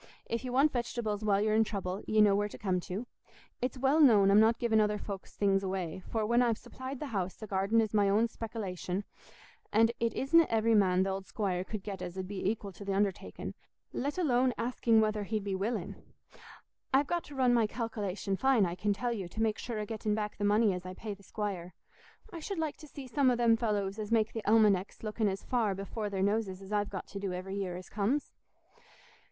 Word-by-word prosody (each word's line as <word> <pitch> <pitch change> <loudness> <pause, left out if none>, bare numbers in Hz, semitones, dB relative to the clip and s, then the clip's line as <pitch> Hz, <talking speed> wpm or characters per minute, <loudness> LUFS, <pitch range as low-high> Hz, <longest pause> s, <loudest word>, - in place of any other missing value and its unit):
If 230 +2 -3
ye 255 - -4
want 275 +4 +4
vegetables 235 -4 -2
while 200 -2 +3
ye're 215 +1 +2
in 220 +1 +5
trouble, 195 -3 -4
ye 215 0 +4
know 205 -2 +6
where 205 +1 +1
to - - -10
come 185 -3 0
to. 190 +6 -5 0.6
It's 255 +2 -2
well 270 +4 +3
known 210 -8 +6
I'm 205 - +7
not 225 +1 +5
giving 225 -2 +3
other 210 0 +1
folks' 200 -2 -7
things 195 -1 +2
away, 185 -2 -3
for 220 -2 0
when 235 +3 +3
I've 235 -3 +2
supplied 260 0 -8
the - - -4
house, 185 -2 -1
the 220 - -8
garden's 210 +2 +1
my 205 -2 +4
own 215 +4 +3
spekilation, 200 -5 -4 0.7
and 225 +2 +4
it 230 -1 0
isna 330 +5 +4
every 225 0 +2
man 190 -3 +4
th' - - -1
old 190 0 -4
squire 185 -4 -1
could 205 0 -6
get 195 -3 -6
as 180 0 -6
'ud 185 -1 -4
be 195 -1 -5
equil 205 -2 -4
to 200 - -10
the 195 -1 -2
undertaking, 200 -2 -2 0.4
let 285 +6 -2
alone 255 -7 +2
asking 230 -1 +2
whether 215 -1 0
he'd 215 0 -2
be 200 -1 -2
willing 200 +5 -2 1.0
I've 275 +2 +4
got 345 +3 -1
to 290 - -11
run 255 -2 +3
my 230 -3 +3
calkilation 210 -4 -3
fine, 265 -6 +4
I 170 - -2
can 205 +3 0
tell 240 +4 -2
you, 195 -6 -4
to 195 - -9
make 220 -1 +1
sure 235 -2 -4
o' 210 - -2
getting 215 -1 -2
back 210 -1 -3
the 205 - -3
money 205 0 +4
as 180 0 -5
I 185 0 -7
pay 215 +1 -5
the 200 - -14
squire. 190 -4 -5 0.6
I 335 - -5
should 385 +4 -5
like 315 -2 -2
to 305 - -12
see 280 -2 -9
some 260 +1 +2
o' 250 - +3
them 235 -1 +4
fellows 210 -3 -1
as 215 0 -5
make 220 -1 +2
the 225 - -3
almanecks 210 -3 +3
looking 215 0 0
as 195 0 -2
far 225 -6 0
before 205 +2 -4
their 195 -1 -1
noses 200 -2 0
as 195 +1 -8
I've 205 -1 +1
got 190 - -5
to 200 - -6
do 195 -2 -3
every 185 +2 -5
year 185 -3 -3
as 180 - -10
comes." 225 +8 -1
210 Hz, 225 wpm, -31 LUFS, 195-230 Hz, 1.0 s, I'm